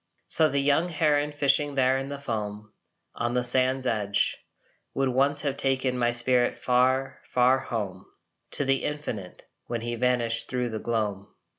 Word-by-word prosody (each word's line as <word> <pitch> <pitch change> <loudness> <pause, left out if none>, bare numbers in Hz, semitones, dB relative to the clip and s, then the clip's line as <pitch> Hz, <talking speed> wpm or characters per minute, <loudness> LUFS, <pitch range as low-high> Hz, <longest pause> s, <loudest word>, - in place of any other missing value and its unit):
So 160 -1 +4
the 140 - -1
young 145 +5 +2
heron 150 -2 +1
fishing 145 0 +1
there 130 -1 +3
in 135 +1 -3
the 140 - -5
foam 105 -5 -5 0.4
On 120 +1 -2
the 125 - +1
sand's 130 +1 +1
edge, 105 -4 0 0.6
Would 135 -1 +1
once 140 +3 +1
have 140 -2 -1
taken 130 -1 +1
my 120 -1 +1
spirit 120 +1 +2
far, 130 +1 +1
far 125 +1 +3
home 100 -8 -5 0.5
To 145 - +1
the 135 0 +1
infinite, 120 -11 -5 0.2
when 120 -1 -3
he 120 +1 -3
vanished 120 -1 0
thro 125 -1 -1
the 110 -1 -4
gloam. 105 -4 -2
125 Hz, 160 wpm, -26 LUFS, 115-140 Hz, 0.6 s, So